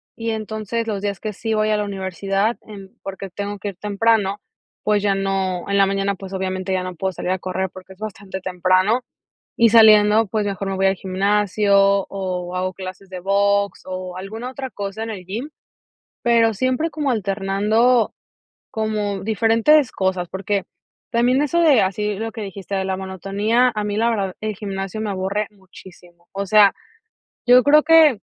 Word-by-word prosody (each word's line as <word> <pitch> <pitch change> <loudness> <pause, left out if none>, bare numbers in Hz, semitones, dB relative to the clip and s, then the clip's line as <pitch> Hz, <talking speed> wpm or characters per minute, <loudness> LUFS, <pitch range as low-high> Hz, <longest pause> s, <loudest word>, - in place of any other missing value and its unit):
Y 230 0 -3
entonces 220 +1 -3
los 205 -2 -3
días 200 -3 -2
que 215 - -4
sí 225 +2 -3
voy 215 0 +1
a 215 - +2
la 210 - 0
universidad 195 +2 -2
en 195 -3 -12
porque 195 0 -6
tengo 205 +2 -5
que 205 - -4
ir 195 - -9
temprano, 205 0 +1 0.4
pues 210 -1 +1
ya 200 -1 +2
no 195 -2 -2
en 200 - +1
la 195 - +5
mañana, 195 0 -1
pues 195 0 -10
obviamente 190 0 -2
ya 185 - 0
no 185 -1 -6
puedo 190 +3 -2
salir 180 - -4
a 185 - +1
correr 185 0 -3
porque 185 0 -12
es 190 - -25
bastante 200 -3 -7
temprano. 185 +5 +2 0.6
Y 230 -1 +5
saliendo, 215 -1 +6
pues, 210 +2 -1
mejor 195 -1 -3
me 195 - -2
voy 195 - +1
al 195 - +2
gimnasio 200 +2 +1 0.3
o 185 -2 -4
hago 185 0 -2
clases 185 +1 -9
de 185 -1 -6
box 200 +1 +1
o 185 -1 -6
alguna 220 +6 -6
otra 265 0 -6
cosa 200 +1 -5
en 225 - -5
el 185 -4 -8
gym. 230 - -5 0.7
Pero 230 -2 +3
siempre 255 +8 0
como 295 -4 -2
alternando 210 +3 +1 0.6
como 210 -2 -2
diferentes 230 +6 +3
cosas, 185 -2 -1
porque 200 0 -2 0.5
también 250 +3 +3
eso 320 +4 +1
de 300 -8 +5
así 205 +2 -1
lo 225 +3 -4
que 225 - -7
dijiste 195 0 -7
de 190 0 -1
la 190 0 -1
monotonía, 200 +6 0
a 210 - -1
mí 205 0 -2
la 230 +1 +2
verdad 195 -5 -2
el 215 -1 -3
gimnasio 195 0 -5
me 215 - -2
aburre 195 +2 -2
muchísimo. 180 -3 -17
O 200 +1 -3
sea, 210 -1 +6 0.7
yo 250 0 +7
creo 300 +1 +6
que, 310 -8 +6
200 Hz, 180 wpm, -21 LUFS, 190-220 Hz, 0.7 s, yo